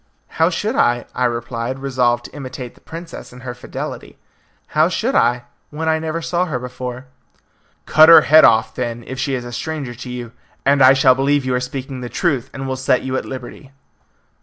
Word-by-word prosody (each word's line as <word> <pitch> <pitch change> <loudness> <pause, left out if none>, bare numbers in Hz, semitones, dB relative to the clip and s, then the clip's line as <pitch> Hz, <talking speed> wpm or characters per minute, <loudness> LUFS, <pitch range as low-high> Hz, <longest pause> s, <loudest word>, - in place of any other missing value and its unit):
"How 165 - +5
should 210 +7 -2
I?" 120 - +2
I 125 - 0
replied, 120 +1 -3
resolved 125 -3 0
to - - -11
imitate 130 -3 -7
the - - -23
princess 165 +1 -9
in 125 0 -13
her 125 -1 -6
fidelity. 125 - -7 0.5
"How - - +3
should - - -1
I, 120 0 +2 0.3
when 160 +2 -4
I 160 0 +2
never 160 +1 -4
saw 175 +2 0
her 150 -7 -3
before?" 125 0 -6 0.8
"Cut 155 +1 +6
her 165 - +10
head 155 +1 +6
off," 110 0 +4
then, 120 -2 -4
"if 130 0 -7
she 135 0 -1
is 125 -1 -5
a 120 - -7
stranger 145 0 -4
to 125 +2 -9
you, 120 -2 -6 0.3
and 140 0 +3
I 130 +1 +8
shall 130 -1 +5
believe 135 +1 +1
you 130 - 0
are 125 - +1
speaking 130 +1 -6
the 120 - -6
truth, 135 -6 -1
and 135 -1 -6
will 130 0 -3
set 130 -1 +1
you 130 0 -3
at - - -2
liberty." 130 +1 -9
130 Hz, 205 wpm, -19 LUFS, 125-145 Hz, 0.8 s, her